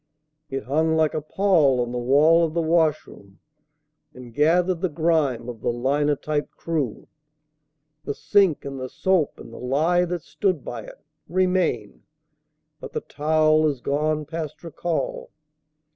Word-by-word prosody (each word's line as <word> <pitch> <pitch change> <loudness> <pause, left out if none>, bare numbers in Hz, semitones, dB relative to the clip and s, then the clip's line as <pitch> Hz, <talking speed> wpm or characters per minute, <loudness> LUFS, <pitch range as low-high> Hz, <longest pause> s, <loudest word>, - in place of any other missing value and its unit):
It 135 -3 -4
hung 160 +6 +1
like 155 -1 +2
a 155 - -2
pall 155 -6 +2
on 120 -1 -1
the 125 - -3
wall 150 +7 +4
of 160 -1 -2
the 170 - +2
washroom, 155 - -1 0.8
And 125 -2 -11
gathered 170 +5 +2
the 185 - 0
grime 150 -7 0
of 120 -3 -7
the - - 0
linotype 145 +4 0
crew. 150 -9 -3 1.0
The 140 - -3
sink 195 -9 +2
and 135 -1 -6
the 130 0 -5
soap 185 -2 0
and - - -11
the - - -9
lye 160 +8 +1
that 175 -1 -4
stood 185 -8 -1
by 115 -3 -6
it - - -13 0.3
Remain; 180 - 0 0.8
but - - -9
the - - -2
towel 155 +1 +2
is 140 -4 -2
gone 150 +3 -1
past 155 0 -6
recall. 165 0 -3
155 Hz, 145 wpm, -23 LUFS, 135-165 Hz, 1.0 s, wall